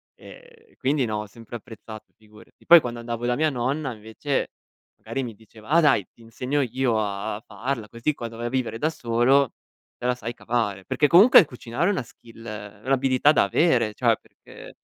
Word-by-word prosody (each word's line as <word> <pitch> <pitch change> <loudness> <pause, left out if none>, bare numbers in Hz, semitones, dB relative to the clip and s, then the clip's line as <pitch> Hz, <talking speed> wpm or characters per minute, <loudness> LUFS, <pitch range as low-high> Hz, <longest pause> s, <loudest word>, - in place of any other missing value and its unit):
ehm, 465 -3 -16
quindi 135 0 +1
no, 110 -2 -2
ho 105 - -5
sempre 115 +3 -10
apprezzato 110 -1 -12
figurati. 110 +1 -20
Poi 170 -2 +9
quando 120 -1 -5
andavo 120 0 -4
da 125 - +1
mia 155 +3 +1
nonna 130 +2 -2
invece, 110 +6 -3 0.5
magari 135 - -5
mi 115 -3 -7
diceva: 110 +1 -18
"Ah 170 +3 +5
dai, 110 - +3
ti - - -23
insegno 125 +5 -2
io 125 -2 0
a 105 0 -3
farla 110 +2 -4
così 120 +7 -2
quando 115 -1 -7
vai 120 - -3
a - - -3
vivere 125 -3 -2
da 155 - +1
solo, 125 0 +2 0.5
te - - -8
la 125 0 +2
sai 120 0 -6
cavare". 105 -6 -2
Perché 150 - +2
comunque 195 - +8
cucinare 125 +5 -2
è - - +3
una 185 -10 -2
skill 115 0 -16
è 105 -1 -8
un'abilità 135 +1 +3
da - - +4
avere, 120 -10 +2
cioè - - +2
perché - - -15
120 Hz, 190 wpm, -24 LUFS, 110-140 Hz, 0.5 s, Poi